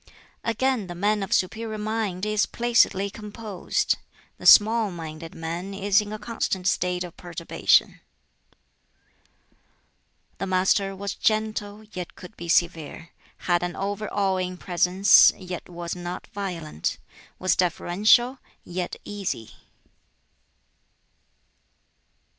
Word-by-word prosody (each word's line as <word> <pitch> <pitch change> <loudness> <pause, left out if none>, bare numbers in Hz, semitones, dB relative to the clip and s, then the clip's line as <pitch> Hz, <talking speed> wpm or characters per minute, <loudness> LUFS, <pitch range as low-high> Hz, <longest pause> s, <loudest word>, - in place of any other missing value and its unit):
Again, 230 -2 0
"The 175 - -7
man 205 +3 +1
of 195 - -4
superior 220 +4 0
mind 210 -3 -2
is 215 -1 +1
placidly 230 -5 +2
composed; 210 -2 -2 0.4
the - - -1
small 220 0 +7
minded 165 -2 -8
man 170 +4 -5
is 200 +1 +3
in 210 0 -7
a 215 - -4
constant 210 -5 -3
state 180 -1 +1
of 175 -1 -9
perturbation." 175 -1 +1 2.4
The 195 - -2
Master 190 +1 +2
was 200 +1 -4
gentle, 215 -1 -1
yet 180 -2 -6
could 180 - -12
be 170 0 -8
severe; 165 -1 0 0.3
had 175 -1 +2
an 175 0 -3
over 205 +2 -3
awing 185 -2 0
presence, 180 +2 +5
yet 180 -2 -7
was 170 0 -5
not 175 0 -6
violent; 170 - -3 0.4
was 185 - +1
deferential, 210 +8 +3 0.3
yet 175 0 -4
easy. 195 - -4
190 Hz, 110 wpm, -25 LUFS, 175-210 Hz, 2.4 s, small